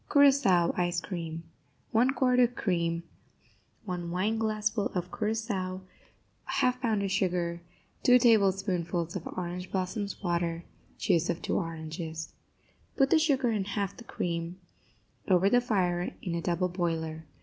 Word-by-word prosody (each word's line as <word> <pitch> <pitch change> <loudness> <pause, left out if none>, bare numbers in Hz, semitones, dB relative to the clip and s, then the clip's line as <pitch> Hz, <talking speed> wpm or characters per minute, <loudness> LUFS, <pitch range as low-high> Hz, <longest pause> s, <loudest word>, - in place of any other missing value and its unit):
CURAÇAO 270 - +5
ICE 175 0 +1
CREAM 165 -2 -5 0.5
1 250 +4 +3
quart 250 -1 +3
of 245 0 +4
cream 170 -3 0 0.8
1 175 -3 -4
wineglassful 215 +3 0
of 180 0 -2
curaçao 210 -4 -2 0.7
1/2 250 0 +1
pound 220 -5 +1
of 195 - -1
sugar 175 -4 0 0.4
2 250 0 +7
tablespoonfuls 190 -7 +2
of 185 - -4
orange 180 0 -5
blossoms 200 +2 -3
water 170 -1 -1 0.3
Juice 170 +1 +2
of 170 - -2
two - - 0
oranges 160 -1 -5 0.6
Put 270 -1 +3
the 320 - +6
sugar 270 -6 +2
and 200 -3 -1
half 200 -1 -2
the 240 - -11
cream 170 -3 -3 0.7
over 190 +1 +4
the 245 - +5
fire 180 -7 0
in 175 - -2
a 170 - -1
double 175 +2 0
boiler. 160 -3 -2
185 Hz, 135 wpm, -29 LUFS, 170-220 Hz, 0.8 s, 2